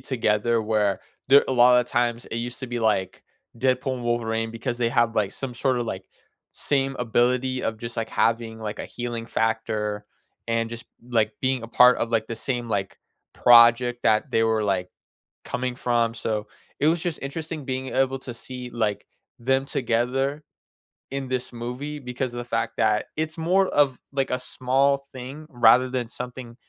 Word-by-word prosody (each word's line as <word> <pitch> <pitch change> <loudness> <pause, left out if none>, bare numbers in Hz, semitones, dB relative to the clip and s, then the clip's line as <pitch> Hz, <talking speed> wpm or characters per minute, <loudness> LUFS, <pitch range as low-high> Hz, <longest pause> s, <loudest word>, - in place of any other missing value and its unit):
together, 115 -3 +1
where 105 -2 +1 0.3
there 140 +1 +7
a - - +1
lot 125 0 +6
of 120 - -4
times 120 0 0
it 115 - -5
used 120 +1 -4
to 130 - -4
be, 120 -1 -3
like, 105 -5 0 0.4
Deadpool 130 +1 +1
and 120 - -7
Wolverine 115 -1 -1
because 115 +1 -4
they 120 - +2
have, 120 -3 +2
like, 105 -3 0
some 130 -3 -5
sort 130 +1 +1
of, 120 - -2
like, 95 -3 -5 0.5
same 135 -1 -1
ability 125 +2 +1
of 110 - -2
just, 120 +1 -7
like, 115 - -3
having, 115 0 0
like, 105 -1 -5
a - - -5
healing 120 -1 -4
factor 110 -2 -1 0.4
and 115 0 0
just, 115 0 -7 0.3
like, 110 0 +2
being 130 -2 0
a 115 - -7
part 125 +1 +6
of, 115 - -1
like, 115 -1 +1
the 115 - -4
same, 120 0 -3
like, 100 -3 -2 0.3
project 120 0 +6
that 110 +6 +2
they 115 - +3
were, 110 -1 +2
like, 95 -3 0 0.6
coming 125 0 -3
from. 120 -2 +1
So, 110 -2 -3 0.3
it 150 - +3
was 170 0 -1
just 170 -2 -3
interesting 155 +1 -5
being 130 0 -3
able 135 0 +1
to 125 -1 -8
see, 125 +1 -8
like, 105 -4 -2 0.3
them 135 +3 +1
together 135 +5 -1 0.7
in 135 -1 -3
this 130 -1 -2
movie 125 +5 -5
because 125 -1 -4
of 120 - -6
the 120 - -5
fact 115 -1 -1
that 105 0 +2
it's 160 +1 -2
more 185 +4 +2
of, 140 -6 +2
like, 135 -1 -1
a 125 - 0
small 135 +2 +1 0.2
thing 135 +4 -8
rather 125 -1 +5
than 125 -2 -2
something 125 -1 -8
120 Hz, 180 wpm, -24 LUFS, 115-130 Hz, 0.7 s, there